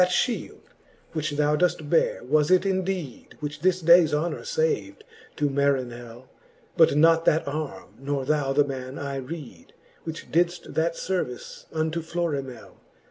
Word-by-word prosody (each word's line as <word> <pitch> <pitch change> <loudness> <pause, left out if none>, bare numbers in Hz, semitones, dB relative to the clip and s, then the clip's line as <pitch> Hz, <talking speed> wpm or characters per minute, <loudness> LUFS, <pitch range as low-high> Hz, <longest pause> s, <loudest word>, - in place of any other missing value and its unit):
Thatflileld, 180 +6 0 0.5
which 155 -1 -1
thou 150 +1 +2
doeft 165 -2 0
beare, 165 -4 +1
was 150 +3 +2
it 185 +1 +4
indeed, 185 -8 -3
Which 150 0 -5
this 185 +1 +2
dayes 170 -2 +6
honour 170 - -2
fav'd 475 -3 -1 0.3
to 145 - +1
Marinell; 130 -4 -2 0.5
But 160 -4 +5
not 165 +1 +5
that 155 0 +2
arme, 140 -10 -5
nor 135 0 -2
thou 145 -1 +1
the 145 +2 +4
man, 130 -1 -6
I 140 -1 -4
reed, 135 - -8 0.3
Which 160 0 -7
didft 175 +1 0
that 165 +1 0
fervice 175 -11 -4
unto 160 +1 -1
Florimell. 145 -7 -4
155 Hz, 140 wpm, -25 LUFS, 140-170 Hz, 0.5 s, dayes